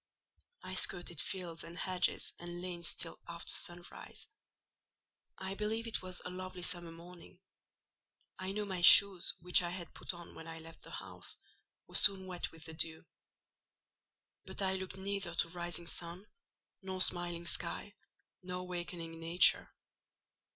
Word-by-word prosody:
I - - -6
skirted 175 -3 +1
fields, 175 -2 -4
and 170 +1 -9
hedges, 185 -1 +1
and 175 0 -6
lanes 175 -2 -2
till 165 - -4
after 170 -1 -1
sunrise. 175 -2 -3 1.1
I 190 0 -3
believe 215 +3 -2
it 230 - -1
was 185 -1 -3
a 180 - -4
lovely 185 0 -6
summer 175 -1 0
morning: 175 +2 -13 1.0
I 185 +1 -2
know 210 +1 -2
my 190 -3 -3
shoes, 185 0 +8
which 180 +1 +6
I 175 - -2
had 175 -1 -6
put - - +2
on 175 -1 -10
when 165 - -10
I 165 0 -7
left 165 0 -12
the - - -12
house, - - -4 0.5
were - - -18
soon 195 -2 +7
wet 180 -2 -4
with 165 -1 -12
dew. 160 -1 -2 1.4
But - - -4
I 190 0 +2
looked 190 0 -4
neither 195 -2 -3
to 165 - +2
rising 175 0 -2
sun, 170 +3 -4 0.6
nor 190 -1 -5
smiling 175 -2 -1
sky, 205 +3 0 0.5
nor 180 0 -4
wakening 175 -2 -5
nature. 165 +2 +5
175 Hz, 145 wpm, -35 LUFS, 170-185 Hz, 1.4 s, shoes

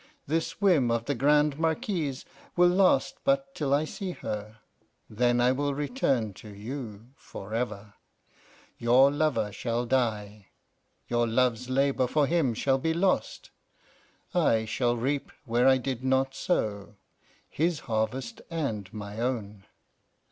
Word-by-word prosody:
This 165 +1 -2
whim 175 - +4
of 115 0 0
the 145 - 0
Grande 150 +1 +3
Marquise 160 - -1 0.3
will 175 0 +5
last 190 +8 +3
but 275 0 +1
till 145 -3 -2
I 145 +2 +3
see 185 +3 -5
her; 105 -4 -6 0.5
then 120 +2 +1
I 125 +1 +4
will 140 +1 -1
return 135 - 0
to 110 - -11
you 110 +1 -7
forever. 110 -3 -5 0.9
Your 125 +4 +5
lover 145 -8 0
shall 120 +3 -2
die, 105 -5 -1 0.6
your 120 0 +1
love's 125 +1 +1
labour 135 -1 +2
for 150 +3 +2
him 145 -6 +1
shall 135 +3 +1
be 160 +4 0
lost. 185 +2 0 0.8
I 115 -11 +2
shall 120 +2 0
reap 135 +4 -2
where 120 +1 +2
I 130 0 +6
did 130 -1 -4
not 130 0 +1
sow 105 - -2 0.5
his 165 0 -1
harvest 115 +2 -2
and 115 - -3
my 105 0 -7
own. 105 -5 -3
130 Hz, 135 wpm, -28 LUFS, 110-150 Hz, 0.9 s, I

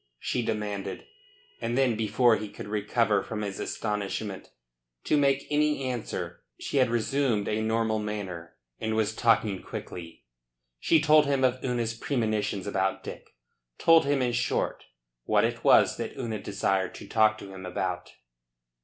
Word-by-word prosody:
she 125 - -1
demanded. 105 -3 -3 0.6
And 120 +2 -1
then 130 -4 +3
before 110 +2 +3
he 105 0 -5
could - - -9
recover 105 0 +1
from 105 +1 -5
his 100 -1 -4
astonishment 105 -1 -3 0.5
to - - +2
make 140 -1 +2
any 150 -1 +2
answer 125 -4 -4 0.2
she - - -3
had 130 -2 +4
resumed 120 -2 +1
a 110 +1 0
normal 110 0 +1
manner, 100 -6 -5 0.2
and 110 0 -1
was 110 -1 +1
talking 110 -4 +2
quickly. 85 -2 -8 0.6
She 160 - +4
told 150 -1 +5
him 140 -2 +1
of 130 0 +1
Una's 120 -3 -1
premonitions 110 -6 -1
about 95 -1 -1
Dick. - - -9 0.4
Told 165 -2 +5
him, 140 -2 +2
in 125 - +1
short, 120 - -1 0.4
what - - +3
it - - -1
was - - +5
that - - -5
Una 115 -4 -3
desired 95 -2 -1
to - - -10
talk 110 -1 +3
to 100 -2 -10
him 95 -1 -9
about. 90 0 -3
110 Hz, 155 wpm, -28 LUFS, 105-125 Hz, 0.6 s, told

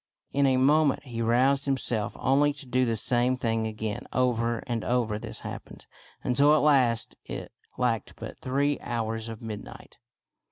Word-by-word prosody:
In 140 0 +3
a 130 -1 +3
moment 145 +2 +3
he 120 -4 -5
roused 130 +5 +3
himself 120 -6 -1
only 145 +2 +3
to 140 -1 -10
do 130 0 +1
the 115 -1 0
same 120 +3 +2
thing 115 -2 0
again. 110 -1 -4
Over 120 -2 0
and 115 -2 -2
over 115 -4 0
this - - -7
happened, - - -9 0.4
until 145 +4 +4
at - - +3
last 130 -6 +3
it - - -6 0.3
lacked 120 -4 -1
but - - -9
three 140 +2 0
hours 115 -1 -3
of 115 0 -8
midnight. 110 -2 -9
125 Hz, 160 wpm, -27 LUFS, 115-135 Hz, 0.4 s, until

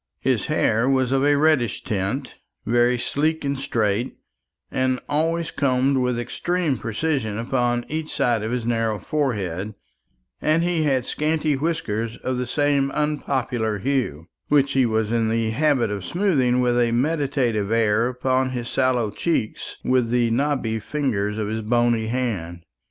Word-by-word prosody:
His - - 0
hair 115 +4 +2
was 130 -2 +2
of 135 0 +2
a 145 0 +4
reddish 145 -5 +2
tint, 110 +6 -3 0.3
very 120 +2 +3
sleek 155 +5 -1
and 140 -1 -1
straight, 115 -3 -1 0.5
and 130 0 0
always 165 +2 0
combed 135 0 +1
with 125 -2 0
extreme 160 +4 -1
precision 115 -2 -2
upon 120 0 0
each 155 0 -4
side 120 -3 +1
of 110 - -3
his 125 -2 -2
narrow 115 -2 0
forehead; 105 - -2 0.7
and 155 +2 +2
he 170 -3 +1
had 130 -4 +1
scanty 155 0 0
whiskers 115 -7 -2
of 130 -1 -3
the 125 - -2
same 140 0 +1
unpopular 130 -7 -1
hue, 120 - -1 0.2
which 140 -1 +3
he 130 -2 +3
was 110 -1 0
in 115 -1 +1
the 115 0 0
habit 130 -3 +2
of 100 -2 -4
smoothing 135 - +1
with 120 -1 +2
a 120 -1 +3
meditative 130 -6 0
air 115 0 +2
upon 130 +1 0
his 120 -2 -4
sallow 125 -5 +1
cheeks 135 -3 -2
with 125 -2 +2
the 120 -1 +2
knobby 125 -3 0
fingers 105 -5 -2
of 110 -1 -2
his 110 +1 -2
bony 120 0 +1
hand. 100 -9 -3
125 Hz, 150 wpm, -23 LUFS, 115-140 Hz, 0.7 s, a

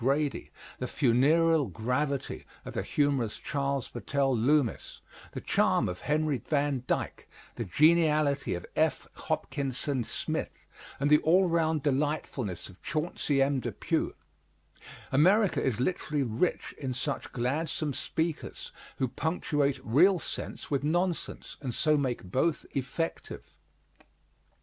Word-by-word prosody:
Grady, 140 +3 0 0.3
the 125 - -2
funereal 150 +4 +3
gravity 130 +4 -2 0.2
of - - -7
the - - -1
humorous 140 -7 0
Charles 140 -2 -2
Battell 135 +2 0
Loomis, 130 +2 +1 0.3
the - - -5
charm - - +2
of 90 0 -4
Henry 150 -2 +1
Van 145 -4 0
Dyke, - - -2 0.3
the 115 - -4
geniality 150 - +3
of 85 - -6
F. - - +1
Hopkinson 135 -1 -2
Smith, - - -4 0.3
and 145 +2 +1
the 150 - +8
all 180 +4 +4
round 160 -3 +1
delightfulness 140 - -1
of 95 -1 -16
Chauncey 150 -3 0
M. 135 0 +1
Depew? - - -2 1.0
America 190 +8 +4
is 120 -4 0
literally 150 0 0
rich 120 +9 -1
in 130 -3 -2
such 135 +3 -3
gladsome 145 +4 -1
speakers, 160 +3 -3 0.3
who 130 - +1
punctuate 145 -1 0
real 175 - +5
sense - - -5
with 140 -1 +1
nonsense, 175 +3 -1
and 125 -5 -3
so 155 -1 +3
make 130 -4 -1
both 130 - 0
effective. 140 +5 -4
145 Hz, 120 wpm, -29 LUFS, 130-155 Hz, 1.0 s, the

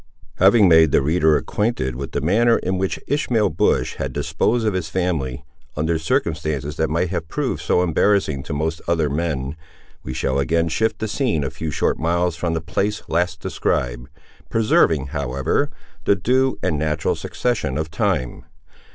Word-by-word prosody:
Having 100 +2 +6
made 80 -3 +6
the - - +3
reader 80 0 +3
acquainted 105 - -1
with 70 +2 -6
the 70 - -1
manner 115 - +3
in 95 0 -2
which 95 0 -1
Ishmael 120 -8 +1
Bush - - +1
had - - -3
disposed 120 -1 0
of 105 - +1
his 90 -4 -2
family, 75 -7 -2 0.3
under 80 +2 0
circumstances 75 -2 -1
that 80 - +1
might 85 +3 0
have 80 -3 -3
proved - - -2
so 90 - +2
embarrassing 85 -4 +2
to - - -7
most 80 +2 -2
other 80 -4 +1
men, 75 -3 -2 0.5
we - - -6
shall 65 +2 0
again 85 +4 +1
shift 110 +7 0
the 110 - -3
scene 110 - 0
a 70 - -3
few 80 - -5
short - - 0
miles 85 +1 +1
from 85 -1 -2
the 80 - -2
place 100 +5 -2
last 85 -2 -1
described, - - -2 0.4
preserving, 80 -10 +2
however, 70 -2 -1 0.4
the 100 - +4
due 130 +7 +1
and 75 - 0
natural 75 0 0
succession 115 - -2
of 80 0 -3
time. 65 -5 -1
80 Hz, 170 wpm, -21 LUFS, 75-95 Hz, 0.5 s, Having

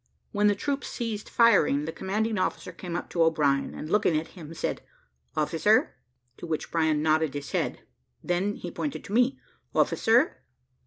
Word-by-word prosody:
When 205 0 +2
the 205 - +3
troops 280 +4 -2
ceased 220 -3 -4
firing, 155 -11 +4
the 160 - -3
commanding 215 +4 -1
officer 185 0 -2
came 170 0 -6
up - - -3
to 170 - 0
O'Brien, 150 -4 +2
and 155 - -6
looking 180 -3 +2
at 155 - -3
him, 165 -5 -11
said, - - -2 0.6
"Officer?" - - +3 0.4
to - - -8
which 160 -2 -3
O'Brien 160 -2 +1
nodded 155 -2 +2
his 145 -1 -5
head. - - -2 0.4
He - - -15
then 190 +4 0 0.2
pointed 290 - -4
to 200 - -8
me 250 +3 +3 0.4
"Officer?" - - +3
175 Hz, 165 wpm, -27 LUFS, 155-210 Hz, 0.6 s, firing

